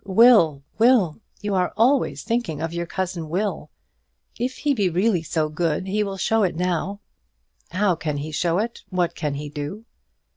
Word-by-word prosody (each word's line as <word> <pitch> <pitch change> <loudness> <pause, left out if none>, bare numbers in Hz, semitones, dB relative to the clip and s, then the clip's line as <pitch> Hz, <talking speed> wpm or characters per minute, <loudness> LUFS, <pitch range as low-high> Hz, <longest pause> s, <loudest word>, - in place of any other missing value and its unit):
"Will, 190 - +5 0.2
Will! 225 -7 +4 0.2
You 205 -1 -2
are 180 -2 +1
always 255 +4 +2
thinking 230 -11 -1
of 165 +1 -3
your 170 0 -3
cousin 175 -3 -3
Will. 200 +5 -2 0.7
If 255 +2 -2
he 290 -1 +1
be 205 -7 +1
really 185 +1 +2
so 160 -1 -1
good 160 +2 -1
he 200 +3 0
will 195 -1 -4
show 220 +4 +2
it 185 -5 +1
now." 180 +3 -1 0.7
"How 190 +2 +2
can 155 -3 -3
he 150 +2 -5
show 170 +3 0
it? 230 +3 -2
What 180 -2 0
can 150 -2 -3
he 145 +1 -5
do?" 150 +9 -6
180 Hz, 175 wpm, -23 LUFS, 160-215 Hz, 0.7 s, Will